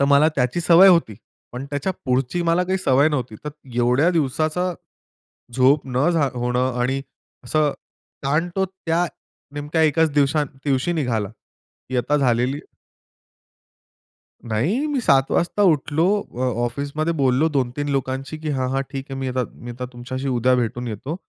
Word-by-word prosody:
तर 140 - +4
मला 140 +2 +5
त्याची 125 +6 0
सवय 175 +3 +7
होती. 170 - +4 0.4
पण 125 +2 -5
त्याच्या 145 +6 -1
पुढची 130 +6 0
मला 170 +2 +2
काही 190 +1 0
सवय 140 -3 +3
नव्हती. 130 -7 -3
तर 150 - -3 0.3
एवढ्या 125 +8 +3
दिवसाचा 160 +3 0 0.8
झोप 135 +3 +4
न 130 +6 +1
झा 155 -5 +2
होणं 125 +1 -1
आणि 135 +2 0 0.4
असं, 150 +3 +2 0.5
ताण 150 +5 +1
तो 190 0 +2
त्या 175 -2 -1 0.5
नेमक्या 150 +3 -1
एकाच 160 0 +3
दिवसा 145 +1 +2 0.2
दिवशी 135 +4 +1
निघाला. 115 - -1 0.6
की 130 - -1
आता 145 +5 +1
झालेली 125 +1 +1 1.9
नाही, 180 - 0
मी 290 -3 -1
7:00 135 - +3
वाजता 175 +4 +1
उठलो, 145 +2 0 0.2
अ, - - -14 0.3
ऑफिसमध्ये 145 +6 -2
बोललो 135 +4 +3
2-3 135 +3 -1
लोकांशी, 135 +2 -2
की 155 0 -5
"हां, 130 -3 -1
हां, 135 +1 0
ठीक 135 -1 -5
आहे, 135 - -5
मी 130 - -2
आता 125 0 -1
मी 120 - -9
आता 125 +1 -6
तुमच्याशी 130 +3 -5
उद्या 125 0 +2
भेटून 120 +1 -3
येतो." 115 +8 -5
140 Hz, 155 wpm, -22 LUFS, 125-160 Hz, 1.9 s, सवय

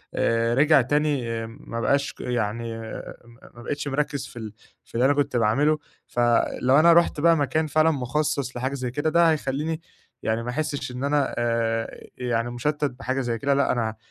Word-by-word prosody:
آآ، 115 0 +1
رجع 145 +1 +5
تاني 130 -4 0
ما 115 0 -7
بقاش 140 +3 +1
ك - - -12
يعني 115 -1 -2
آآ، 115 - -7
آآ، 110 +1 -9
م 120 0 -18
ما - - -10
بقيتش 145 +3 -3
مركّز 140 0 -2
في 125 -2 -10
ال 110 -2 -7 0.3
في - - -18
اللي 120 +2 +3
أنا 140 - +5
كنت 140 -3 0
باعملُه 135 +8 +3 0.3
فلو 120 +3 +2
أنا 170 +2 +7
رُحت 170 -2 +3
بقى 165 +2 +5
مكان 150 +2 0
فعلًا 155 +2 +3
مخصَّص 140 -1 -1
لحاجة 130 +3 -2
زَيّ 130 -3 -3
كده، 145 +5 0
ده 170 +1 +4
هيخلّيني 155 +2 -2 0.4
يعني 110 +1 0
ما 120 - -4
أحسّش 140 0 -3
إن 125 +2 -5
أنا 145 -1 +1
آآ، 115 -1 -1 0.2
يعني 120 -1 -1
مشتَّت 150 +5 -1
بحاجة 130 0 -2
زَيّ 120 -2 -2
كده 140 +5 +1
لأ، 140 0 +2
أنا 110 -3 -1
130 Hz, 190 wpm, -24 LUFS, 115-145 Hz, 0.4 s, أنا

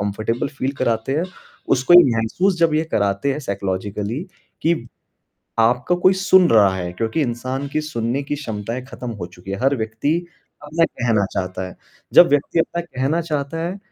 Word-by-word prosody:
Comfortable 110 +6 -2
feel 135 +2 -1
कराते 115 +4 0
हो, 175 - 0 0.5
उसको 130 +7 +4
ये 175 - +10
महसूस 175 - +1
जब 165 -2 +3
ये 155 +1 +2
कराते 100 +6 +1
हैं 150 - -4
साइकोलॉजिकली 100 - -3 0.4
कि 160 -7 +1 0.7
आपका 125 +9 +3
कोई 185 - +6
सुन 190 -2 +5
रहा 100 -4 +5
है 90 -1 -4
क्योंकि 115 - -2
इंसान 130 +2 -2
की 155 +2 -1
सुनने 125 -3 -2
की 145 +1 -3
क्षमताएँ 115 -2 -5
खत्म 125 -2 -7
हो 85 - -3
चुकी 90 +1 -12
हैं, 95 - -3
हर 135 +1 +3
व्यक्ति 110 +8 -1 0.5
अपना 160 +3 +1
कहना 115 -9 0
चाहता 95 0 -3
है। - - -13 0.4
जब 175 - +9
व्यक्ति 145 +3 +1
अपना 170 +1 0
कहना 145 +1 -1
चाहता 155 -1 -3
है 190 - -6
130 Hz, 175 wpm, -21 LUFS, 110-155 Hz, 0.7 s, ये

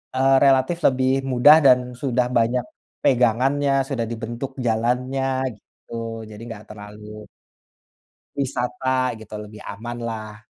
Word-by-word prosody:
eee, 135 +1 +4
relatif 135 +4 +3
lebih 130 0 +2 0.2
mudah 130 +5 +7
dan 130 -2 +7 0.2
sudah 125 -1 0
banyak 120 +1 +1 0.4
pegangannya, 130 +3 +2 0.2
sudah 125 -5 -1
dibentuk 120 +4 -5 0.2
jalannya 125 +4 0 0.3
gitu, 115 +2 -8
jadi 105 - -11
nggak 110 -2 -9
terlalu 105 0 -10 1.1
Wisata 130 -1 -1
gitu 110 -1 -10
lebih 105 0 -10
aman 120 +4 -7
lah. 110 -2 -6
120 Hz, 115 wpm, -22 LUFS, 110-130 Hz, 1.1 s, mudah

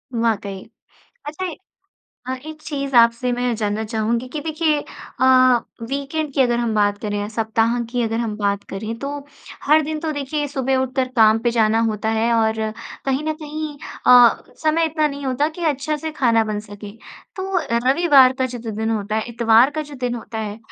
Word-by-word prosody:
वाकई। 210 -4 -1 0.6
अच्छा 305 +5 -4
ए - - -8 0.7
अ, 260 - -2
एक 310 0 -9
चीज़ 275 -3 -4
आपसे 235 +1 +4
मैं 245 0 0
जानना 210 0 -1
चाहूँगी 230 +3 -1
कि 300 +4 -5
देखिए 315 0 0
अ, 260 - -6 0.6
वीकेंड 280 +2 -3
की - - +1
अगर 240 -2 +1
हम 235 -2 -1
बात 205 -1 +2
करें 205 -1 -3
या 205 - -2
सप्ताह 225 +1 0
की 245 0 -1
अगर 225 0 -1
हम 220 -3 -3
बात 200 -1 -1
करें, 215 +3 -4
तो 280 +2 -5 0.4
हर 305 +2 +5
दिन 310 +1 -4
तो 315 -1 -2
देखिए, 290 +1 -2
सुबह 265 -2 0
उठकर 260 0 -1
काम 220 -1 +6
पे 240 +1 0
जाना 225 -1 +2
होता 215 +1 -2
है 235 +1 +2
और 220 -1 +1 0.4
कहीं 270 +1 0
न 310 - 0
कहीं 305 0 -5 0.3
अ, 245 -2 +7 0.2
समय 315 +1 +3
इतना 310 -1 +1
नहीं 280 -1 -6
होता 265 +3 +1
कि 345 - -3
अच्छा 300 +3 -3
से 315 +1 -5
खाना 230 -6 +2
बन 215 -1 -3
सके। 205 -1 -10 0.5
तो 380 -1 -1 0.3
रविवार 275 -3 +6
का 260 - +1
जितना 240 -2 -6
दिन 220 +1 -2
होता 215 -1 -2
है, 220 - 0
इतवार 235 +2 +4
का 310 +1 -3
जो 295 -1 -11
दिन 245 -1 -1
होता 225 -1 -7
है, 210 -1 -5
245 Hz, 190 wpm, -21 LUFS, 220-290 Hz, 0.7 s, अ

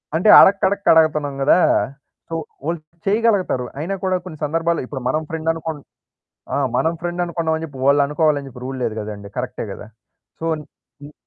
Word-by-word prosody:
అంటే 180 +6 +3
అడక్కడక్క 200 0 +4
అడగతన్నాం 150 -3 +2
కదా! 150 - +5 0.7
సో, 165 - -3 0.3
వాళ్ళు 170 +1 -1 0.3
చేయగలగతారు. 200 - +1
అయినా 175 +6 -2
కూడా 185 -1 +1
కొన్ని 165 -4 -8
సందర్భాల్లో 165 +2 0
ఇప్పుడు 130 0 -6
మనం 155 +4 0
ఫ్రెండ్ 160 0 -2
అనుకుం 160 -1 -5 0.8
ఆ! - - +1 0.2
మనం 160 - +2
ఫ్రెండ్ 175 +1 -2
అనుకున్నాం 165 -2 -1
అని 160 - -4
చెప్పి 145 -4 -9
వాళ్ళనుకోవాలని 145 +1 +2
చెప్పి 125 -1 -12
రూల్ 130 0 -5
లేదు 110 -2 -2
కదండీ. 105 -1 -7
కరెక్టే 125 -2 -4
కదా! 100 - -9 0.5
సో 165 - -7 0.6
హ్మ్. 145 +1 -10
160 Hz, 160 wpm, -20 LUFS, 140-170 Hz, 0.8 s, కదా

